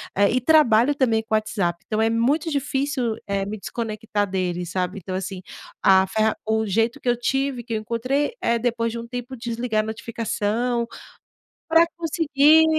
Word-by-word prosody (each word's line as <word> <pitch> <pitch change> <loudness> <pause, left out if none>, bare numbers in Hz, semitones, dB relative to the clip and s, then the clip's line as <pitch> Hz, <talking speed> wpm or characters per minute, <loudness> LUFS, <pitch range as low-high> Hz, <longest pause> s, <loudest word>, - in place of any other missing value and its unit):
eh, 200 0 +4
e 255 - +1
trabalho 275 -2 +4
também 230 -5 +2
com 220 0 -1
o - - +6
WhatsApp, 195 -5 -1
então 215 0 -1
é 225 - +3
muito 275 +8 +1
difícil, 275 -4 -1
eh, 195 -1 -1
me 210 +1 -5
desconectar 215 -2 -3
dele, 180 -2 -2
sabe? 180 +2 -2
Então, 185 0 -6
assim, 190 0 -5 0.4
a 190 0 +6
ferra 220 +2 +1
o 220 0 0
jeito 225 +7 0
que 255 - -9
eu 245 - +4
tive, 270 +1 -1
que 230 -1 -6
eu - - +1
encontrei, 255 - -1
é 235 0 +2
depois 230 -1 -1
de 235 - -5
um 235 0 -7
tempo 245 +1 -6
desligar 230 -2 -1
a - - -6
notificação, 230 +1 -2 0.8
pra 330 +1 +6
conseguir, 320 -2 +4
230 Hz, 180 wpm, -23 LUFS, 215-260 Hz, 0.8 s, o